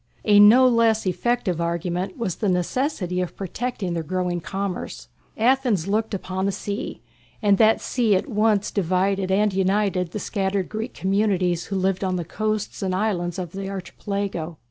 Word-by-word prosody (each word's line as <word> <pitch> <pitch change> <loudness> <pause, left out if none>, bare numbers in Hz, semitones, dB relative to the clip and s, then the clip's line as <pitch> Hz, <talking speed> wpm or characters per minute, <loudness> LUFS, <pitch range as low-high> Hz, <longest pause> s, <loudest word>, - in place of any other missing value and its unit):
A 205 -1 +6
no 235 +5 +8
less 230 -3 +3
effective 190 -2 0
argument 175 +2 -2
was 195 -8 -2
the 210 - 0
necessity 180 - -1
of 180 - -4
protecting 200 -1 -3
their 165 - -1
growing 180 +1 -2
commerce. 195 +1 -5 0.3
Athens 235 -6 +2
looked 215 +1 0
upon 190 0 -2
the - - +1
sea, 205 +3 -5 0.4
and 205 -3 +3
that 220 0 +5
sea 230 -5 +1
at 185 - -1
once 210 -2 +1
divided 190 +1 0
and 205 +1 +2
united 190 -1 +1
the 195 - -5
scattered 195 -2 -1
Greek 220 +3 -5
communities 190 -3 +1
who 195 - -4
lived 190 0 0
on 185 -1 0
the 175 -2 -3
coasts 215 +4 -3
and 185 -2 -1
islands 180 -4 -1
of 180 -3 -4
the 195 +1 -5
Archipelago. 190 -3 -4
195 Hz, 165 wpm, -23 LUFS, 180-215 Hz, 0.4 s, no